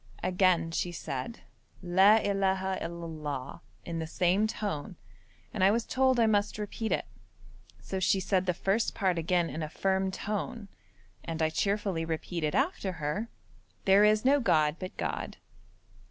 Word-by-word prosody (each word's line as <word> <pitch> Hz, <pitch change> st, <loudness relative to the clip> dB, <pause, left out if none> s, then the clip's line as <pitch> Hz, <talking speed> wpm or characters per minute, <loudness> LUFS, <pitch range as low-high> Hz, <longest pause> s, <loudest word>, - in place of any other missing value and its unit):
Again 180 Hz, -2 st, +2 dB
she 175 Hz, +1 st, -1 dB
said 160 Hz, -, -5 dB, 0.4 s
'La 190 Hz, +4 st, +6 dB
illaha 190 Hz, -2 st, 0 dB
il 170 Hz, 0 st, -5 dB
Allah' 150 Hz, -2 st, -5 dB, 0.2 s
in 165 Hz, -1 st, -4 dB
the 160 Hz, -, -3 dB
same 185 Hz, +6 st, +2 dB
tone, 200 Hz, -4 st, -4 dB, 0.6 s
and 205 Hz, -, 0 dB
I 190 Hz, -, +7 dB
was 225 Hz, +2 st, +1 dB
told 260 Hz, -1 st, +2 dB
I 230 Hz, -, +5 dB
must 210 Hz, -1 st, +1 dB
repeat 215 Hz, +1 st, -4 dB
it. -, -, 0 dB, 0.7 s
So 190 Hz, -, -4 dB
she 190 Hz, +1 st, +2 dB
said 185 Hz, -1 st, 0 dB
the 180 Hz, -, +2 dB
first 200 Hz, +6 st, 0 dB
part 185 Hz, -3 st, +1 dB
again 170 Hz, +1 st, +1 dB
in 160 Hz, -, -5 dB
a 155 Hz, -, -3 dB
firm 190 Hz, +3 st, 0 dB
tone, 210 Hz, +3 st, -4 dB, 0.5 s
and 165 Hz, -2 st, -5 dB
I 160 Hz, -1 st, +1 dB
cheerfully 200 Hz, -3 st, 0 dB
repeated 160 Hz, -1 st, -2 dB
after 270 Hz, -, 0 dB
her, 165 Hz, +8 st, -3 dB, 0.6 s
'There 195 Hz, +1 st, +6 dB
is 215 Hz, +2 st, +3 dB
no 280 Hz, +2 st, +5 dB
god 155 Hz, -, +2 dB
but 185 Hz, -1 st, -7 dB
God.' -, -, -3 dB
190 Hz, 155 wpm, -29 LUFS, 165-210 Hz, 0.7 s, I